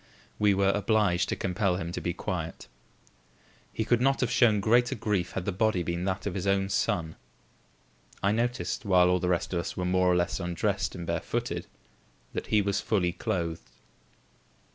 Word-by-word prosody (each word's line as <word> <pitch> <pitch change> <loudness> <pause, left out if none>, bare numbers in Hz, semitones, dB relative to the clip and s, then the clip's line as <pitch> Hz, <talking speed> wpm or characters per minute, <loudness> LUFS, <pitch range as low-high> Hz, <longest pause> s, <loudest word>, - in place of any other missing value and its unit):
We 105 -1 +4
were 100 0 +3
obliged 100 -3 +2
to - - 0
compel 95 0 0
him 85 -2 -4
to - - -4
be 85 - -1
quiet. 90 -3 -5 1.0
He 110 - -2
could 120 +1 +2
not 135 +1 +3
have 125 - 0
shown 115 -4 +4
greater 120 +5 +3
grief 105 -6 -1
had 95 - -3
the - - 0
body 95 -2 +1
been 85 +1 -2
that 95 -1 -2
of 100 - -2
his 95 +1 -3
own 95 0 +2
son. 90 -5 -1 1.1
I 100 - +3
noticed, 120 +3 -1
while 90 -4 +4
all 90 - +2
the 90 +1 -1
rest 90 +1 0
of 85 - +1
us 85 - -5
were 90 - -1
more 90 0 +2
or 90 - +4
less 90 +1 0
undressed 95 +3 -1
and 85 -1 -6
barefooted, - - -3 0.7
that - - -4
he 105 -1 +3
was 100 0 0
fully 95 -5 +1
clothed. 85 -8 -3
95 Hz, 185 wpm, -28 LUFS, 90-105 Hz, 1.1 s, We